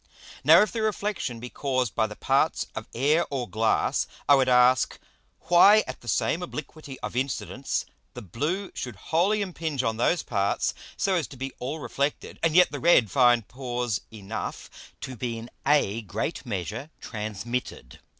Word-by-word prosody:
Now -, -, +8 dB
if 215 Hz, -, -3 dB
the 225 Hz, -, -3 dB
Reflexion 205 Hz, -, -2 dB
be 125 Hz, +1 st, -8 dB
caused 130 Hz, -5 st, -1 dB
by 110 Hz, -, +1 dB
the 105 Hz, -, -9 dB
parts -, -, +1 dB
of -, -, -6 dB
Air 150 Hz, +7 st, +2 dB
or 130 Hz, -4 st, -3 dB
Glass, 110 Hz, +3 st, +1 dB, 0.2 s
I 145 Hz, -, +7 dB
would 135 Hz, -2 st, +4 dB
ask, 125 Hz, +1 st, +4 dB, 0.4 s
why 175 Hz, +6 st, +6 dB
at -, -, -8 dB
the 120 Hz, -, -15 dB
same 120 Hz, -, +1 dB
Obliquity 150 Hz, -4 st, -7 dB
of -, -, -5 dB
Incidence 130 Hz, +1 st, -2 dB, 0.3 s
the -, -, -7 dB
blue 155 Hz, -, -3 dB
should 125 Hz, -3 st, -5 dB
wholly 180 Hz, -, +1 dB
impinge 160 Hz, -7 st, -3 dB
on 110 Hz, -2 st, -1 dB
those 155 Hz, +7 st, +1 dB
parts, 100 Hz, -3 st, 0 dB, 0.2 s
so 195 Hz, -, +1 dB
as 170 Hz, -8 st, 0 dB
to 135 Hz, -, -12 dB
be 135 Hz, +1 st, -5 dB
all 130 Hz, +5 st, -3 dB
reflected, 145 Hz, -1 st, -3 dB
and 165 Hz, -1 st, +1 dB
yet 180 Hz, -5 st, +6 dB
the 145 Hz, -, -4 dB
red 145 Hz, -, +4 dB
find 120 Hz, -4 st, +4 dB
Pores 125 Hz, -3 st, -3 dB
enough 110 Hz, 0 st, -6 dB, 0.3 s
to 130 Hz, -, -6 dB
be 120 Hz, -1 st, -3 dB
in 115 Hz, +1 st, -9 dB, 0.2 s
a 130 Hz, -7 st, +3 dB
great 110 Hz, -, -4 dB
measure 110 Hz, -, -4 dB
transmitted. 110 Hz, +3 st, -5 dB
130 Hz, 170 wpm, -26 LUFS, 115-160 Hz, 0.4 s, Now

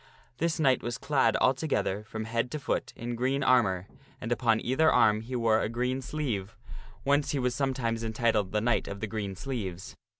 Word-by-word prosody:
This 165 Hz, +1 st, 0 dB
knight 135 Hz, -5 st, +3 dB
was 120 Hz, 0 st, -3 dB
clad 135 Hz, -6 st, +2 dB
altogether 130 Hz, -6 st, +1 dB
from 110 Hz, 0 st, -5 dB
head 115 Hz, +2 st, -1 dB
to 150 Hz, -, -4 dB
foot -, -, -2 dB
in 120 Hz, +1 st, -5 dB
green 130 Hz, +4 st, 0 dB
armor, 100 Hz, -9 st, +3 dB, 0.3 s
and 120 Hz, -, -5 dB
upon 115 Hz, -2 st, +2 dB
either 130 Hz, +8 st, +3 dB
arm 105 Hz, 0 st, +4 dB
he 125 Hz, +3 st, -6 dB
wore 115 Hz, -2 st, +3 dB
a -, -, -1 dB
green 125 Hz, +3 st, -1 dB
sleeve, 125 Hz, -8 st, -3 dB, 0.5 s
whence 145 Hz, +1 st, +2 dB
he -, -, 0 dB
was 125 Hz, -2 st, 0 dB
sometimes 120 Hz, -4 st, -1 dB
entitled 110 Hz, -3 st, 0 dB
the 105 Hz, -, +1 dB
Knight 120 Hz, 0 st, +1 dB
of 100 Hz, -, -6 dB
the 110 Hz, -, -2 dB
Green 100 Hz, -3 st, -4 dB
Sleeves. 100 Hz, -6 st, -5 dB
120 Hz, 190 wpm, -29 LUFS, 110-130 Hz, 0.5 s, arm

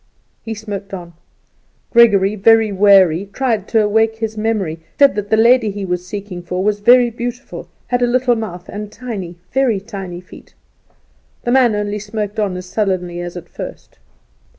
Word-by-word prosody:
He 225 Hz, -1 st, -5 dB
smoked 205 Hz, -2 st, -6 dB
on. 175 Hz, -2 st, -10 dB, 0.8 s
Gregory, 210 Hz, -4 st, +5 dB
very 220 Hz, +1 st, +4 dB
weary, 195 Hz, -2 st, +4 dB
tried 230 Hz, -7 st, -1 dB
to 220 Hz, -2 st, +2 dB
wake 220 Hz, +1 st, +2 dB
his 220 Hz, -1 st, -4 dB
memory, 210 Hz, -7 st, -2 dB, 0.2 s
said 280 Hz, -1 st, +6 dB
that 205 Hz, -1 st, -4 dB
the 220 Hz, -, +3 dB
lady 230 Hz, 0 st, +4 dB
he 200 Hz, 0 st, -5 dB
was 180 Hz, -1 st, -2 dB
seeking 200 Hz, -3 st, -6 dB
for 180 Hz, +1 st, -3 dB
was 205 Hz, 0 st, 0 dB
very 240 Hz, +3 st, +5 dB
beautiful, 245 Hz, +3 st, -6 dB, 0.2 s
had 245 Hz, 0 st, -1 dB
a 245 Hz, -, +3 dB
little 245 Hz, 0 st, +2 dB
mouth, 185 Hz, -5 st, -6 dB
and 210 Hz, 0 st, -7 dB
tiny, 205 Hz, -7 st, -6 dB, 0.2 s
very 255 Hz, -6 st, +1 dB
tiny, 190 Hz, -3 st, -7 dB
feet. 180 Hz, -, -16 dB, 0.9 s
The 240 Hz, -, -1 dB
man 250 Hz, -4 st, +4 dB
only 210 Hz, 0 st, -2 dB
smoked 210 Hz, 0 st, -4 dB
on 195 Hz, -4 st, -1 dB
as 180 Hz, -, -7 dB
sullenly 180 Hz, -3 st, -2 dB
as 175 Hz, 0 st, -6 dB
at 175 Hz, 0 st, -9 dB
first. -, -, -9 dB
210 Hz, 170 wpm, -17 LUFS, 190-225 Hz, 0.9 s, said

